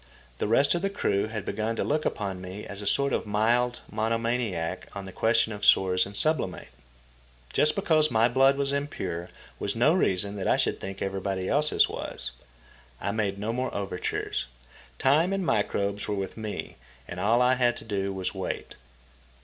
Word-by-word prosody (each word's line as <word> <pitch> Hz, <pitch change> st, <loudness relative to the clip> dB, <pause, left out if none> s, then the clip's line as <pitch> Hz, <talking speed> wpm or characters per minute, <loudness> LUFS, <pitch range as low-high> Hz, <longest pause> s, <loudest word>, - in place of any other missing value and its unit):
The -, -, 0 dB
rest 135 Hz, +6 st, +4 dB
of 175 Hz, -, -1 dB
the 195 Hz, -, 0 dB
crew 100 Hz, -, 0 dB
had 110 Hz, -2 st, -5 dB
begun 110 Hz, +1 st, -2 dB
to -, -, -1 dB
look 150 Hz, +1 st, 0 dB
upon 95 Hz, -3 st, -2 dB
me 95 Hz, +3 st, -7 dB
as 100 Hz, 0 st, -7 dB
a 100 Hz, -, -5 dB
sort 140 Hz, +6 st, +2 dB
of -, -, -1 dB
mild 120 Hz, +4 st, +1 dB
mono 110 Hz, +1 st, 0 dB
maniac 115 Hz, -8 st, -2 dB
on 100 Hz, -1 st, -5 dB
the 95 Hz, -, -8 dB
question 115 Hz, +2 st, +2 dB
of 105 Hz, 0 st, -8 dB
sores 95 Hz, -2 st, +5 dB
and 100 Hz, 0 st, -1 dB
sublimate. 155 Hz, -, 0 dB, 0.8 s
Just 150 Hz, -, +4 dB
because 155 Hz, -5 st, +3 dB
my 115 Hz, -2 st, +4 dB
blood 135 Hz, +3 st, +4 dB
was 140 Hz, 0 st, 0 dB
impure 95 Hz, -, -3 dB, 0.3 s
was -, -, -2 dB
no -, -, +4 dB
reason 100 Hz, +2 st, +1 dB
that 95 Hz, -, -2 dB
I -, -, +4 dB
should -, -, 0 dB
think 95 Hz, 0 st, -5 dB
everybody 95 Hz, -1 st, -2 dB
else's 150 Hz, +1 st, +3 dB
was. -, -, -5 dB, 0.7 s
I 100 Hz, -, -2 dB
made 100 Hz, -2 st, -1 dB
no 105 Hz, +3 st, -2 dB
more 125 Hz, +1 st, -1 dB
overtures. 95 Hz, -9 st, -2 dB, 0.5 s
Time 155 Hz, +7 st, +3 dB
and 195 Hz, -2 st, -1 dB
microbes 100 Hz, -5 st, 0 dB
were 105 Hz, -, -1 dB
with 95 Hz, -1 st, -4 dB
me, 110 Hz, -2 st, -5 dB, 0.3 s
and -, -, -6 dB
all 115 Hz, +4 st, +3 dB
I 125 Hz, +1 st, +4 dB
had 125 Hz, -1 st, +2 dB
to -, -, -9 dB
do 100 Hz, -2 st, -1 dB
was 95 Hz, -1 st, -3 dB
wait. 95 Hz, -1 st, -4 dB
110 Hz, 185 wpm, -27 LUFS, 100-125 Hz, 0.8 s, sores